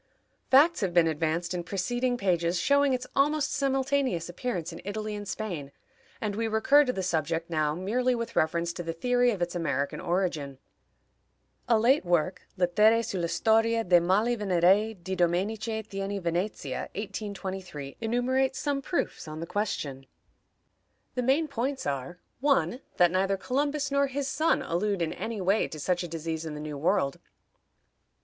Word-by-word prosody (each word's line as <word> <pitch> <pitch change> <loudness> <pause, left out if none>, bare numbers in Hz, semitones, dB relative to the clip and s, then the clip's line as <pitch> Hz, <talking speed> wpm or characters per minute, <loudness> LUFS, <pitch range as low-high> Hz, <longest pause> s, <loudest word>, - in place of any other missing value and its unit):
Facts 295 +4 +5
have 185 -3 -1
been 170 -1 +6
advanced 165 +2 -1
in 175 -1 -3
preceding 245 +7 -1
pages 175 -4 +1
showing 280 +7 +3
its 255 -1 -1
almost 295 +1 +2
simultaneous 270 - 0
appearance 175 -3 -3
in - - -9
Italy 215 +2 -4
and 205 -1 -6
Spain, 175 -12 -4 0.5
and 210 -4 -2
we 225 +1 -1
recur 225 +7 +5
to 255 - 0
the 190 -6 -3
subject 165 -1 -1
now 155 -2 +1
merely 245 +8 0
with 230 -1 -5
reference 170 +2 +1
to 175 - -5
the 165 -1 -4
theory 245 +7 +2
of 200 -7 0
its 175 - -3
American 140 -5 -1
origin. 170 -6 -1 1.1
A 230 - +5
late 255 +6 +4
work, 175 0 +1 0.2
Lettere 210 +6 +4
sulla 175 -4 -2
Storia 225 +4 +2
de 175 -3 +5
Mali 205 +7 +2
Venerei, 200 +2 +3
di 190 +1 -5
Domenice 205 +5 0
Thiene, 195 0 -4
Venezia, 170 -5 -2
1823, 190 -7 -6
enumerates 255 +3 +1
some 285 -2 -1
proofs 340 - -2
on 155 0 -6
the 165 - -4
question. 145 -9 -3 1.1
The 250 - -1
main 275 +6 +2
points 270 0 -3
are: 140 +4 -3 0.2
1. 275 -2 +1 0.2
That 175 -1 +5
neither 195 +1 +1
Columbus 285 +6 -1
nor 280 0 +3
his 275 0 -3
son 310 +4 +1
allude, 190 +1 0
in 160 - -2
any 225 -2 -4
way, 195 +4 +2
to 155 - -8
such 180 +4 0
a 175 - -4
disease 165 0 -4
in 155 -2 -5
the - - -6
New 150 -1 -5
World. 165 -3 +1
195 Hz, 160 wpm, -28 LUFS, 170-245 Hz, 1.1 s, been